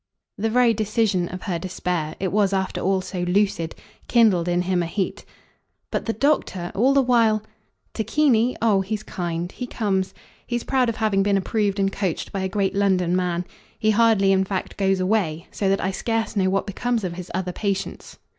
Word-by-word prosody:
The 220 Hz, +2 st, -1 dB
very 240 Hz, 0 st, +4 dB
decision 215 Hz, -4 st, 0 dB
of 185 Hz, 0 st, -7 dB
her 175 Hz, -4 st, -2 dB
despair 175 Hz, -3 st, -3 dB
it 190 Hz, -1 st, -1 dB
was 200 Hz, -1 st, +2 dB
after 190 Hz, -1 st, -1 dB
all 190 Hz, 0 st, +1 dB
so 185 Hz, 0 st, -6 dB
lucid 175 Hz, -2 st, 0 dB, 0.3 s
kindled 210 Hz, -8 st, +4 dB
in 175 Hz, 0 st, +1 dB
him 180 Hz, -1 st, +1 dB
a 170 Hz, -, -2 dB
heat. 190 Hz, +2 st, -3 dB, 0.7 s
"But -, -, -2 dB
the 225 Hz, -, +1 dB
doctor, 215 Hz, -9 st, 0 dB
all 250 Hz, +8 st, +3 dB
the 275 Hz, -, +5 dB
while 225 Hz, -4 st, +3 dB, 0.3 s
?" -, -, -46 dB
"Tacchini? 240 Hz, +1 st, +2 dB
Oh 205 Hz, -4 st, +4 dB
he's 210 Hz, +2 st, -3 dB
kind. 175 Hz, -1 st, -4 dB
He 250 Hz, -, -6 dB
comes. 195 Hz, -5 st, -1 dB, 0.3 s
He's 240 Hz, -1 st, -2 dB
proud 255 Hz, -3 st, +1 dB
of 230 Hz, -, -2 dB
having 215 Hz, -3 st, +1 dB
been 200 Hz, 0 st, +2 dB
approved 205 Hz, 0 st, 0 dB
and 195 Hz, 0 st, +2 dB
coached 190 Hz, -5 st, -2 dB
by 195 Hz, -, -3 dB
a 190 Hz, -, -1 dB
great 195 Hz, -1 st, 0 dB
London 185 Hz, -3 st, +2 dB
man. 180 Hz, -1 st, 0 dB, 0.3 s
He 215 Hz, -2 st, +2 dB
hardly 215 Hz, -3 st, +4 dB
in 190 Hz, 0 st, +3 dB
fact 190 Hz, 0 st, -4 dB
goes 195 Hz, -1 st, +1 dB
away; 185 Hz, -4 st, 0 dB
so 195 Hz, -, -1 dB
that 195 Hz, -, +2 dB
I 190 Hz, -, 0 dB
scarce 225 Hz, +3 st, -2 dB
know 190 Hz, -2 st, +2 dB
what 195 Hz, +1 st, 0 dB
becomes 230 Hz, +3 st, -1 dB
of 180 Hz, -2 st, -2 dB
his 180 Hz, 0 st, -8 dB
other 185 Hz, -1 st, -2 dB
patients. 200 Hz, -1 st, -3 dB
195 Hz, 195 wpm, -23 LUFS, 185-220 Hz, 0.7 s, the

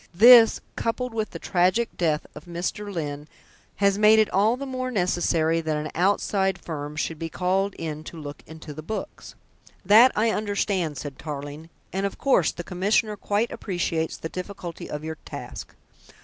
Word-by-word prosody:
This, 230 Hz, +3 st, +8 dB
coupled 245 Hz, +1 st, -2 dB
with 220 Hz, -1 st, -2 dB
the -, -, -7 dB
tragic 185 Hz, +6 st, +1 dB
death 155 Hz, -3 st, 0 dB
of 150 Hz, -, -11 dB
Mr. 180 Hz, +4 st, -4 dB
Lyne, 150 Hz, -4 st, -4 dB, 0.5 s
has 200 Hz, 0 st, +2 dB
made 215 Hz, +1 st, +7 dB
it 215 Hz, -1 st, +3 dB
all 215 Hz, +5 st, +3 dB
the 275 Hz, -, -5 dB
more 255 Hz, -1 st, -3 dB
necessary 175 Hz, -5 st, +1 dB
that 155 Hz, -1 st, -1 dB
an 150 Hz, 0 st, -4 dB
outside 190 Hz, +1 st, +1 dB
firm 150 Hz, -4 st, -6 dB
should 155 Hz, 0 st, -3 dB
be 165 Hz, -, -4 dB
called 190 Hz, +4 st, 0 dB
in 155 Hz, -2 st, -5 dB
to 170 Hz, -, -9 dB
look 145 Hz, -1 st, -8 dB
into 160 Hz, -1 st, -9 dB
the 155 Hz, -, -8 dB
books." 215 Hz, +8 st, -6 dB, 0.5 s
"That 225 Hz, +6 st, +8 dB
I 220 Hz, +1 st, +2 dB
understand," 200 Hz, -7 st, -1 dB
said 140 Hz, -1 st, -7 dB
Tarling, 145 Hz, +1 st, -7 dB, 0.2 s
"and 195 Hz, +1 st, 0 dB
of 195 Hz, -, -9 dB
course, 260 Hz, -, +3 dB
the 175 Hz, -, -7 dB
Commissioner 205 Hz, +4 st, 0 dB
quite 210 Hz, +3 st, -1 dB
appreciates 170 Hz, -4 st, -2 dB
the -, -, -5 dB
difficulty 180 Hz, -1 st, -7 dB
of 150 Hz, 0 st, -5 dB
your 160 Hz, 0 st, -6 dB
task. -, -, -8 dB
180 Hz, 170 wpm, -25 LUFS, 160-210 Hz, 0.5 s, This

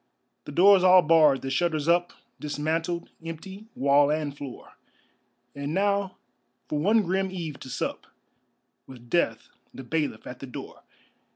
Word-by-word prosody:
The -, -, -7 dB
doors 190 Hz, +4 st, +6 dB
all 185 Hz, -1 st, +7 dB
barred, 150 Hz, -4 st, +4 dB
the 135 Hz, -, -3 dB
shutters 155 Hz, +1 st, 0 dB
up, 175 Hz, +1 st, +2 dB, 0.3 s
Dismantled, 160 Hz, +3 st, -3 dB
empty, 190 Hz, +6 st, -8 dB
wall 140 Hz, +1 st, +4 dB
and 150 Hz, -2 st, -2 dB
floor, 140 Hz, -3 st, -10 dB, 0.8 s
And 140 Hz, +3 st, -4 dB
now 200 Hz, -1 st, 0 dB, 0.5 s
for 150 Hz, -, -2 dB
one 210 Hz, +7 st, +3 dB
grim 190 Hz, +1 st, -1 dB
eve 165 Hz, -6 st, -6 dB
to 130 Hz, -, -10 dB
sup -, -, -4 dB, 0.8 s
With 120 Hz, -2 st, -14 dB
death 115 Hz, -10 st, 0 dB, 0.3 s
the 135 Hz, -, -8 dB
bailiff 145 Hz, -4 st, -2 dB
at -, -, -9 dB
the -, -, -8 dB
door. -, -, -9 dB
160 Hz, 145 wpm, -26 LUFS, 145-185 Hz, 0.8 s, all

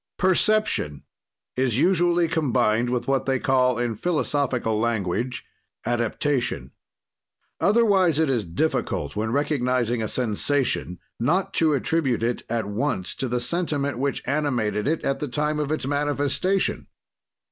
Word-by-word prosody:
"Perception 190 Hz, -, +1 dB, 0.5 s
is 125 Hz, -3 st, +1 dB
usually 175 Hz, +1 st, +3 dB
combined 125 Hz, -7 st, +1 dB
with 120 Hz, -1 st, -2 dB
what 135 Hz, 0 st, 0 dB
they 135 Hz, -1 st, +2 dB
call 125 Hz, -2 st, +2 dB
in 120 Hz, -1 st, -1 dB
philosophical 130 Hz, -, 0 dB
language 115 Hz, +2 st, -1 dB, 0.4 s
adaptation. 120 Hz, +3 st, -1 dB, 0.9 s
"Otherwise 200 Hz, -7 st, +3 dB
it 160 Hz, 0 st, +3 dB
is 125 Hz, -5 st, +1 dB
difficult, 85 Hz, -, -2 dB
when 110 Hz, +1 st, -1 dB
recognizing 125 Hz, -4 st, 0 dB
a 110 Hz, -, -1 dB
sensation, 115 Hz, -, -1 dB, 0.2 s
not 170 Hz, +11 st, +1 dB
to 155 Hz, -3 st, +3 dB
attribute 140 Hz, -5 st, 0 dB
it 120 Hz, +1 st, 0 dB
at 115 Hz, -2 st, -1 dB
once 105 Hz, -2 st, -2 dB
to 135 Hz, -, -3 dB
the 125 Hz, 0 st, -1 dB
sentiment 145 Hz, -4 st, -1 dB
which 140 Hz, 0 st, -1 dB
animated 125 Hz, -7 st, 0 dB
it 160 Hz, +2 st, 0 dB
at 135 Hz, -, 0 dB
the 150 Hz, -, -3 dB
time 150 Hz, +3 st, -1 dB
of 150 Hz, 0 st, -2 dB
its 155 Hz, -, -2 dB
manifestation. 145 Hz, +6 st, 0 dB
135 Hz, 130 wpm, -24 LUFS, 120-155 Hz, 0.9 s, usually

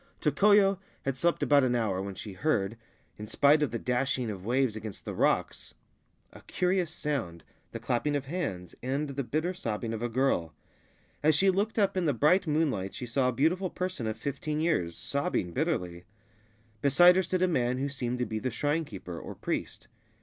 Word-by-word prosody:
Tokoyo 195 Hz, +6 st, +4 dB, 0.2 s
had 135 Hz, -1 st, -1 dB
slept 170 Hz, +6 st, +1 dB
about 145 Hz, -1 st, +5 dB
an 125 Hz, -1 st, +2 dB
hour 105 Hz, -6 st, 0 dB
when 100 Hz, 0 st, -5 dB
she 100 Hz, +1 st, -7 dB
heard, 110 Hz, -4 st, 0 dB, 0.4 s
in 105 Hz, -, -6 dB
spite 145 Hz, +7 st, +4 dB
of 150 Hz, -, +2 dB
the 115 Hz, -, -3 dB
dashing 125 Hz, 0 st, -1 dB
of 95 Hz, -3 st, -8 dB
waves 125 Hz, +1 st, +1 dB
against 110 Hz, -2 st, -8 dB
the -, -, -4 dB
rocks, -, -, 0 dB, 0.6 s
a -, -, -13 dB
curious 180 Hz, -2 st, 0 dB
sound, 140 Hz, -, -3 dB, 0.3 s
the -, -, -6 dB
clapping 145 Hz, +5 st, 0 dB
of 140 Hz, -1 st, -2 dB
hands 135 Hz, -, -4 dB
and 140 Hz, +4 st, -2 dB
the 140 Hz, 0 st, -3 dB
bitter 155 Hz, +9 st, -1 dB
sobbing 115 Hz, -7 st, -3 dB
of 110 Hz, -, -4 dB
a 120 Hz, -, -1 dB
girl. 115 Hz, -10 st, 0 dB, 0.7 s
As 155 Hz, 0 st, +4 dB
she 190 Hz, +5 st, +4 dB
looked 205 Hz, +5 st, -1 dB
up 200 Hz, -3 st, +2 dB
in 185 Hz, -2 st, 0 dB
the 145 Hz, -, +3 dB
bright 175 Hz, -, +3 dB
moonlight 145 Hz, -12 st, 0 dB
she 125 Hz, -, -5 dB
saw 125 Hz, +2 st, +1 dB
a -, -, +1 dB
beautiful 165 Hz, +9 st, +1 dB
person 180 Hz, -12 st, -3 dB
of 110 Hz, 0 st, -3 dB
fifteen 140 Hz, +5 st, -3 dB
years, 155 Hz, -, 0 dB
sobbing 90 Hz, -1 st, -1 dB
bitterly. 90 Hz, -, -2 dB, 0.8 s
Beside 175 Hz, +6 st, +6 dB
her -, -, +4 dB
stood 185 Hz, 0 st, -1 dB
a -, -, +4 dB
man 125 Hz, -7 st, +1 dB
who 135 Hz, +2 st, -1 dB
seemed 125 Hz, -3 st, -3 dB
to 125 Hz, -, -1 dB
be 110 Hz, -2 st, -3 dB
the 130 Hz, -, -2 dB
shrine 145 Hz, +7 st, -1 dB
keeper 90 Hz, -8 st, -8 dB
or -, -, -8 dB
priest. -, -, -4 dB
135 Hz, 195 wpm, -29 LUFS, 110-160 Hz, 0.8 s, Beside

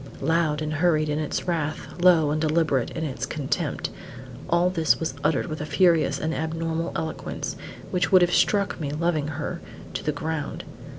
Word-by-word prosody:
Loud 155 Hz, 0 st, +1 dB
and 155 Hz, 0 st, -2 dB
hurried 155 Hz, -1 st, +2 dB
in 150 Hz, +1 st, 0 dB
its 155 Hz, +3 st, -3 dB
wrath, 160 Hz, 0 st, -3 dB
low 165 Hz, -5 st, +5 dB
and 155 Hz, +1 st, 0 dB
deliberate 155 Hz, -5 st, +2 dB
in 160 Hz, -, -4 dB
its 135 Hz, -3 st, -3 dB
contempt, 145 Hz, -2 st, -2 dB, 0.6 s
all 175 Hz, +1 st, +3 dB
this 165 Hz, -4 st, +2 dB
was 160 Hz, -4 st, -2 dB
uttered 160 Hz, -, +2 dB
with 155 Hz, -3 st, -5 dB
a -, -, -2 dB
furious 170 Hz, -5 st, +3 dB
and 160 Hz, +1 st, -1 dB
abnormal 165 Hz, +1 st, -2 dB
eloquence, 160 Hz, -1 st, -4 dB, 0.4 s
which 180 Hz, +1 st, +1 dB
would 185 Hz, -2 st, +7 dB
have 175 Hz, -, +2 dB
struck 200 Hz, -3 st, +2 dB
me, 145 Hz, -, -2 dB
loving 155 Hz, 0 st, 0 dB
her, 155 Hz, +3 st, -4 dB, 0.3 s
to -, -, -4 dB
the 150 Hz, -, +1 dB
ground. 150 Hz, 0 st, -4 dB
160 Hz, 175 wpm, -25 LUFS, 150-170 Hz, 0.6 s, would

